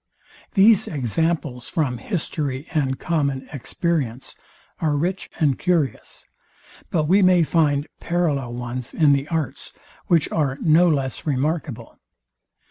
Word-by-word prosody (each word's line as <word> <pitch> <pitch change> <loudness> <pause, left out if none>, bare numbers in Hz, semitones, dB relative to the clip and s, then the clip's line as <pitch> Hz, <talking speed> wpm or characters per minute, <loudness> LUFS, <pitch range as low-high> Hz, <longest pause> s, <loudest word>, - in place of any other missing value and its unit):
These 210 +1 +5
examples 145 -1 -2
from 130 -7 -1
history 150 - -3
and 135 -5 0
common 140 -5 -1
experience 140 -3 -2 0.5
are 155 -3 +1
rich 180 +6 -2
and 145 -6 +2
curious; 170 -7 -1 0.6
but 160 - +1
we 185 +7 +4
may 185 -2 +5
find 150 -3 +2
parallel 150 -8 -1
ones 125 +1 -5
in 150 -3 +5
the 140 +1 0
arts, 160 -4 -3 0.3
which 165 -4 +3
are 140 -4 0
no 170 +2 +4
less 135 -2 -2
remarkable. 140 -4 -2
150 Hz, 120 wpm, -22 LUFS, 135-170 Hz, 0.6 s, These